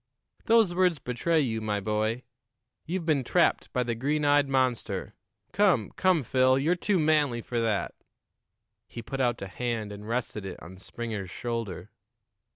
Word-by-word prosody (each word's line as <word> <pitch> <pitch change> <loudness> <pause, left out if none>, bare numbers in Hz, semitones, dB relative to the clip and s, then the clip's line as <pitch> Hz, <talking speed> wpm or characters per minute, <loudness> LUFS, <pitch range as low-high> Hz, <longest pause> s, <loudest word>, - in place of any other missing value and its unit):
"Those 225 -5 +4
words 180 -2 +2
betray 150 +6 0
you, 110 -5 -1
my 105 -1 -1
boy. 110 +4 -1 0.6
You've 175 0 -2
been 150 -5 +2
trapped - - +2
by 125 - 0
the 120 -1 -2
green 145 +6 -1
eyed 145 -1 +4
monster. 130 -3 0 0.4
Come, 190 - +2
come, 185 -6 +2
Phil, 130 +2 +3
you're 155 +6 +2
too 190 +2 0
manly 150 -7 +2
for 120 - -2
that." 110 -3 0 0.9
He 115 - -8
put 135 -1 -4
out 120 -4 0
a - - -5
hand 110 +1 -3
and 105 +1 -9
rested 115 -3 -2
it 95 -2 -7
on 95 +3 -11
Springer's 110 -2 -5
shoulder. 115 -4 -5
125 Hz, 160 wpm, -28 LUFS, 110-150 Hz, 0.9 s, Those